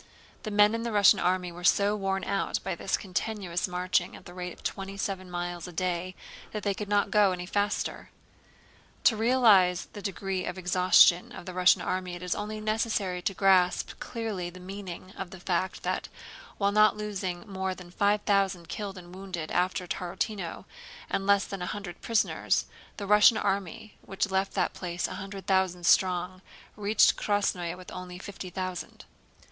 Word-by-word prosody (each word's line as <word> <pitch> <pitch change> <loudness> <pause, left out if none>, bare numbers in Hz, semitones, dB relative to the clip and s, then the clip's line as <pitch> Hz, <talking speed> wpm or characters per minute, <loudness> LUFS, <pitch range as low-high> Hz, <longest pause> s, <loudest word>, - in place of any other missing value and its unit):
The 220 - -5
men 210 +1 +5
in 230 - -1
the 235 0 -3
Russian 205 -2 +6
army 180 0 0
were 175 +1 -10
so 200 +3 +4
worn 195 -2 -1
out 200 0 -1
by 190 - -2
this 190 +3 -1
continuous 195 -1 -2
marching 180 0 0
at - - -13
the 175 - -10
rate 180 0 -5
of - - -14
twenty 195 0 -4
seven 190 -2 -3
miles 175 0 -4
a - - -8
day 180 +1 -2 0.4
that 210 -2 -4
they 200 - +1
could 205 +1 -6
not 205 -1 +2
go 205 -2 +5
any 180 -1 -4
faster. 205 +2 -2 0.9
To 225 - +5
realize 215 -6 +4
the 205 - -7
degree 195 -1 -3
of 180 - -4
exhaustion 180 -1 +5
of - - -9
the 185 - -6
Russian 180 0 +4
army 185 -1 -2
it 175 - -9
is 180 - 0
only 215 +1 -4
necessary 215 -4 -1
to 195 +2 -2
grasp 185 -2 +3
clearly 215 -7 -4
the 180 +1 -12
meaning 185 0 -8
of 190 - -6
the 190 - -11
fact 180 +1 -2
that, - - -2 0.5
while 200 -1 +2
not 215 +1 +5
losing 195 -2 -4
more 190 -1 -3
than 180 -1 -12
five 205 +3 +2
thousand 195 -4 +1
killed 200 -2 -5
and 175 0 -11
wounded 185 -4 -6
after 180 0 0
Tarútino 180 +1 -4 0.5
and 195 - -1
less 200 0 +4
than 195 -2 -6
a 180 - -3
hundred 200 -4 -6
prisoners, 230 -2 +1 0.3
the 200 - -4
Russian 210 +2 +6
army 200 +1 -3
which 195 +1 -2
left 190 +1 0
that - - +1
place 175 -1 -3
a - - -7
hundred 195 0 -8
thousand 185 -2 +1
strong 185 0 +2 0.3
reached 210 +1 +4
Krásnoe 185 -4 0
with 185 - -11
only 180 -1 -7
fifty 195 -1 -8
thousand. 185 -1 -5
190 Hz, 180 wpm, -28 LUFS, 180-205 Hz, 0.9 s, Russian